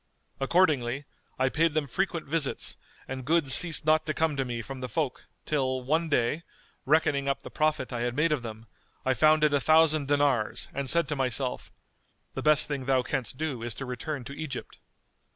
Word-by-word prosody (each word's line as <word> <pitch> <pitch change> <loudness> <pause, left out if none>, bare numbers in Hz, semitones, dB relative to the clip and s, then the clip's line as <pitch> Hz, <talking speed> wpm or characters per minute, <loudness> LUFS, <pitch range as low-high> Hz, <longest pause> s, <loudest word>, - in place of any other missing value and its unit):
Accordingly, 140 -4 +1 0.3
I 130 0 +2
paid 160 +2 +1
them 155 -2 +1
frequent 170 +4 -2
visits 150 -1 -1 0.3
and 130 0 -5
good 155 0 +2
ceased 165 +2 +5
not 155 0 +3
to 155 - -1
come 160 -2 +1
to 135 - 0
me 120 -2 -4
from 135 +2 -8
the 125 - -4
folk 150 -6 -3 0.2
till, 130 -3 -1
one 160 +5 0
day, 145 +2 +1 0.5
reckoning 145 -2 +2
up 140 - -1
the - - -9
profit 155 -4 0
I 120 - -3
had 120 0 -2
made 155 +3 +2
of 150 -4 0
them, 110 -1 -8 0.4
I 130 - +3
found 155 +2 +4
it 150 -1 +3
a 145 - +3
thousand 155 -2 +4
dinars 140 -6 +1
and 140 -1 -3
said 170 +3 +3
to 150 - -1
myself, 130 -1 -2 0.6
The - - -4
best 155 -1 +5
thing 140 -3 -4
thou 130 -1 +2
canst 130 -2 -3
do 145 -6 -3
is 115 -1 -4
to 135 - -6
return 125 +3 -5
to 140 - -8
Egypt. 140 -3 -7
140 Hz, 195 wpm, -27 LUFS, 130-155 Hz, 0.6 s, ceased